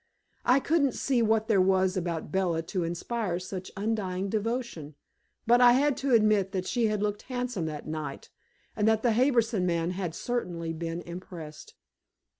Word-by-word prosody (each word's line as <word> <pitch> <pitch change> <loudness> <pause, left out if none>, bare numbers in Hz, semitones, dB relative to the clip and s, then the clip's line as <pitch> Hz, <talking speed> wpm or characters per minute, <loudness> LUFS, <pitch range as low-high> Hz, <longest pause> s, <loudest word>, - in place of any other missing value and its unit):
I 250 +3 +5
couldn't 280 -2 +2
see 260 -3 +1
what 220 -1 +2
there 205 -5 +4
was 190 0 +3
about 170 -4 -3
Bella 175 -3 0
to 180 +2 -2
inspire 175 +3 -2
such 185 0 -6
undying 195 -3 -2
devotion, 215 - -3 0.5
but 240 +2 +5
I 245 -1 +8
had 280 +2 +3
to 270 -3 +2
admit 210 -3 +3
that 185 -1 -2
she 235 +1 +1
had 210 -1 -1
looked 205 0 -1
handsome 245 -9 -2
that 150 -1 -6
night, 155 -3 -6 0.4
and 210 -1 +1
that 220 0 +3
the 240 -3 +3
Harbison 235 -4 +2
man 170 0 0
had 180 -3 -4
certainly 175 -10 -3
been 165 +1 -4
impressed. 170 -3 -9
195 Hz, 165 wpm, -28 LUFS, 175-235 Hz, 0.5 s, I